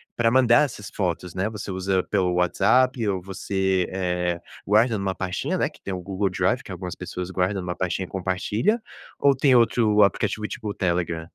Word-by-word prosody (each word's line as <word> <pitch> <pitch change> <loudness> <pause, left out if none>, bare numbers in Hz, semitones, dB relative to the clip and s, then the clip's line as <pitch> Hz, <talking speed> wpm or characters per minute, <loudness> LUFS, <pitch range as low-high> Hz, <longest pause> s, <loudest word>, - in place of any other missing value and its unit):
pra 115 -1 +2
mandar 125 -2 +5
essas 115 -8 -5
fotos, 90 -2 -2
né? 95 +3 0
Você 105 -2 -6
usa 95 0 0
pelo 90 -3 0
WhatsApp 110 +7 +2
ou 95 -2 -1
você, 95 0 -1
eh, 90 -2 -1 0.3
guarda 110 +3 +3
em - - -1
uma 100 -1 -1
pastinha, 100 - -2
né, 155 - +1 0.2
tem 95 - -4
o 90 - -3
Google 95 +2 -1
Drive 95 +7 0
que - - -10
algumas 90 0 -6
pessoas 90 0 -6
guardam 95 +2 0
em - - -7
uma 90 - -3
pastinha 95 +1 -2
e - - -15
compartilha, 105 - 0 0.4
ou 140 -1 +4
tem 135 -1 +4
outro 110 -3 +4
aplicativo 105 +2 0
tipo 105 - -6
o - - -3
Telegram? 85 -3 -1
95 Hz, 195 wpm, -24 LUFS, 90-110 Hz, 0.4 s, mandar